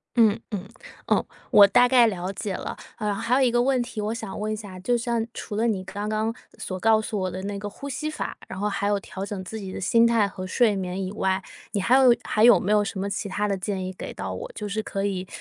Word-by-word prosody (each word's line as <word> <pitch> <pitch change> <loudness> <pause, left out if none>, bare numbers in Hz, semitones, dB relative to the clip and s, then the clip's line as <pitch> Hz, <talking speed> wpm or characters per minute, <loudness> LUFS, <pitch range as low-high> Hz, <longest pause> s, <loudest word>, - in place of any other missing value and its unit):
嗯 225 -2 +4
嗯， 200 -2 -4 0.4
哦 - - +3 0.3
我 200 -1 +9
大 245 +5 +5
概 245 -2 +6
了 185 -2 -2
解 200 0 -4
了， - - -5 0.2
呃， 210 -1 -1
还 230 +5 0
有 275 - +3
一 255 -2 +4
个 240 0 +3
问 260 -1 +2
题 235 -3 -5
我 210 +2 -1
想 225 -4 -6
问 215 +1 -2
一 215 - -1
下， 205 -4 -9
就 240 +6 +1
像 235 -1 -1
除 205 - -6
了 225 +2 +2
你 195 -5 0
刚 205 +2 -5
刚 215 +1 0 0.2
所 185 -1 -5
告 220 +2 +4
诉 210 -1 -3
我 185 - -1
的 185 +1 -5
那 200 0 -3
个 205 0 -5
呼 280 +7 -9
吸 305 +3 -3
法， 310 - -4
然 190 - -7
后 210 - 0
还 200 0 -1
有 205 -1 +2
调 190 0 -7
整 200 -2 -5
自 220 +4 -6
己 190 -2 -6
的 - - -5
心 230 +5 +4
态 230 -3 +3
和 185 -1 -7
睡 220 +1 +3
眠 185 0 -3
以 185 - -4
外， 190 -2 0 0.3
你 200 - 0
还 240 +6 +4
有 255 -3 +7
还 215 - +1
有 235 -7 +8
没 200 - -1
有 210 -1 +4
什 200 -1 -4
么 200 - -1
其 200 - -3
他 205 +2 -1
的 200 - 0
建 190 0 -3
议 185 - -5
给 - - -7
到 - - -5
我， - - -6
就 210 - -4
是 215 +2 -2
可 195 -1 -3
以 190 -2 -2
210 Hz, 290 characters per minute, -25 LUFS, 195-230 Hz, 0.4 s, 我